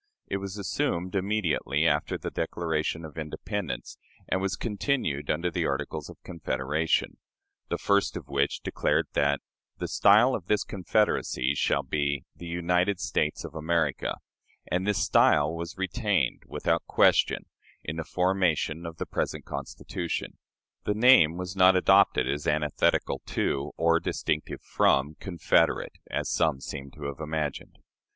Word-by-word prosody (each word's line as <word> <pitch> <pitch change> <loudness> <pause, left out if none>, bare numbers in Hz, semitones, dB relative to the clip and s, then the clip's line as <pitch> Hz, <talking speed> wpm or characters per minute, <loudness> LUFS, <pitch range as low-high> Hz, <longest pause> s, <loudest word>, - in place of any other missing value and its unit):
It - - -2
was 100 0 -6
assumed 95 -3 -2
immediately 95 -6 0
after 75 -2 +1
the - - -5
Declaration 80 -1 -2
of 80 +1 -8
Independence, 80 - -5 0.3
and 95 - 0
was 95 -2 -1
continued 105 - -1
under 85 +3 0
the 85 -1 0
Articles 75 +2 -3
of - - -11
Confederation; 80 -2 -1 0.5
the - - -1
first 100 0 +1
of - - -9
which 70 0 0
declared - - 0
that 70 0 +2 0.4
"the - - -3
style 110 +6 +5
of 90 -7 -4
this 105 -1 +2
confederacy 95 - 0
shall - - +1
be 70 -3 -1
'The 85 - -9
United 90 +3 +1
States 75 - -1
of - - -8
America'"; 80 +1 0 0.6
and 90 +3 0
this 105 - +2
style 75 +1 +4
was 85 +2 -6
retained 95 - 0
without - - 0
question - - +3 0.4
in 80 +2 -5
the 80 - -2
formation 90 -3 0
of 80 -1 -8
the - - -3
present - - -3
Constitution. 85 -2 -5 0.4
The 105 - 0
name 110 -9 +6
was 90 +1 -5
not 95 0 +6
adopted 95 -5 +4
as 70 +2 -2
antithetical 75 -1 +1
to, 70 0 -1
or 85 0 +3
distinctive 75 -2 -2
from, 70 +3 +2
"confederate," 85 -4 +1 0.2
as - - -2
some 80 -5 +1
seem 70 0 -7
to 75 +2 -12
have 70 -1 -5
imagined. 75 -2 -4
85 Hz, 145 wpm, -27 LUFS, 75-95 Hz, 0.6 s, name